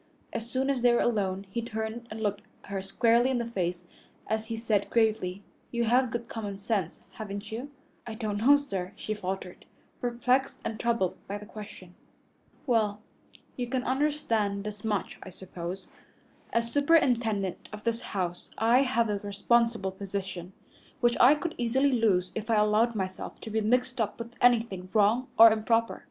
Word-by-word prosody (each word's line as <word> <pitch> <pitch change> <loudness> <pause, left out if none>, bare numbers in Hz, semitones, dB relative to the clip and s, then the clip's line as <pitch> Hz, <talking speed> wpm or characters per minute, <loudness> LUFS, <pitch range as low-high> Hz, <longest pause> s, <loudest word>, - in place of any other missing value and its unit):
As 230 +1 -4
soon 265 +2 +1
as 260 -3 -1
they 245 0 +5
were 240 - +3
alone, 195 -4 0
he 235 - -2
turned 220 +1 -5
and 220 +1 -7
looked 205 -1 -1 0.2
her 195 -1 -4
squarely 230 +5 +3
in 260 - +1
the 235 - -1
face 180 -6 -3 0.4
as 220 0 -2
he 230 - -3
said 220 -3 0
gravely, 215 -4 +1 0.3
"You 235 -1 -1
have 245 +2 +3
good 235 +1 -4
common 205 -4 -5
sense, 200 -4 -2
haven't 205 -1 -7
you?" 245 +6 -5 0.4
"I 225 - -5
don't 215 -3 -2
know, 280 +6 +6
sir," 195 -11 -4
she 215 - -4
faltered, 190 -3 -5 0.3
perplexed 250 +2 0
and 220 - -3
troubled 230 -6 0
by 200 - -3
the 210 - -10
question. 205 -4 -10 0.7
"Well, 215 -5 +1 0.6
you 245 -1 -3
can 255 0 -1
understand 245 -8 0
this 210 -1 -7
much, 210 -3 -2
I - - -9
suppose. 185 0 -7 0.7
As 230 0 0
superintendent 240 - +2
of 210 0 -8
this 230 0 0
house 180 -6 -4
I 230 +4 +4
have 250 -4 +2
a 205 -1 -1
responsible 215 0 +1
position, 190 -2 -5 0.5
which 240 -1 +3
I 260 +5 +8
could 320 +2 -3
easily 260 +4 +2
lose 205 -7 +2
if 220 +1 -5
I 225 - +4
allowed 215 +2 +3
myself 190 -2 -4
to 220 - -7
be 220 +1 +1
mixed 250 +3 +1
up 210 -2 -2
with 235 0 -7
anything 225 -7 +3
wrong 220 +5 +3
or 225 0 +10
improper. 225 +1 +1
220 Hz, 170 wpm, -28 LUFS, 200-240 Hz, 0.7 s, or